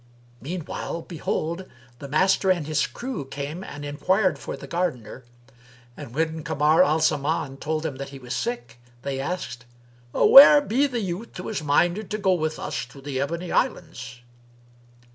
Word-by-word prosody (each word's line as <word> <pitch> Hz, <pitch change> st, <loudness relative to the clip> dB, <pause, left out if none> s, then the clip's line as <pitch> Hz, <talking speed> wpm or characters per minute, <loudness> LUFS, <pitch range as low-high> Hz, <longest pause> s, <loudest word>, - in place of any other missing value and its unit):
Meanwhile 170 Hz, +2 st, -5 dB
behold, 170 Hz, +1 st, -3 dB, 0.3 s
the 140 Hz, -, -7 dB
Master 190 Hz, +6 st, +2 dB
and 175 Hz, -5 st, +2 dB
his 155 Hz, -1 st, 0 dB
crew 250 Hz, -, -5 dB
came 145 Hz, +6 st, -6 dB
and 145 Hz, -5 st, -8 dB
enquired 185 Hz, +3 st, +1 dB
for -, -, -6 dB
the 135 Hz, -, -9 dB
gardener; 135 Hz, -, -3 dB, 0.7 s
and, 115 Hz, -, -10 dB
when 160 Hz, +1 st, -1 dB
Kamar 150 Hz, +3 st, +3 dB
al 155 Hz, +2 st, +2 dB
Zaman 145 Hz, -2 st, 0 dB
told 155 Hz, +2 st, -2 dB
them 150 Hz, -5 st, -4 dB
that 140 Hz, 0 st, -6 dB
he 140 Hz, -, -10 dB
was 125 Hz, -2 st, -6 dB
sick, 120 Hz, -, -4 dB, 0.2 s
they 140 Hz, -1 st, -3 dB
asked, 135 Hz, -6 st, -4 dB, 0.5 s
"Where 290 Hz, -, +9 dB
be 285 Hz, +1 st, +1 dB
the 245 Hz, -4 st, -3 dB
youth 195 Hz, +4 st, -5 dB
who -, -, -6 dB
is 215 Hz, -, -3 dB
minded 175 Hz, +7 st, +1 dB
to 215 Hz, -, -2 dB
go 190 Hz, -3 st, +2 dB
with 155 Hz, -3 st, -1 dB
us -, -, -4 dB
to 140 Hz, -, -14 dB
the 135 Hz, -1 st, -3 dB
Ebony 170 Hz, +5 st, -3 dB
Islands?" 125 Hz, -, -2 dB
155 Hz, 160 wpm, -24 LUFS, 140-185 Hz, 0.7 s, Where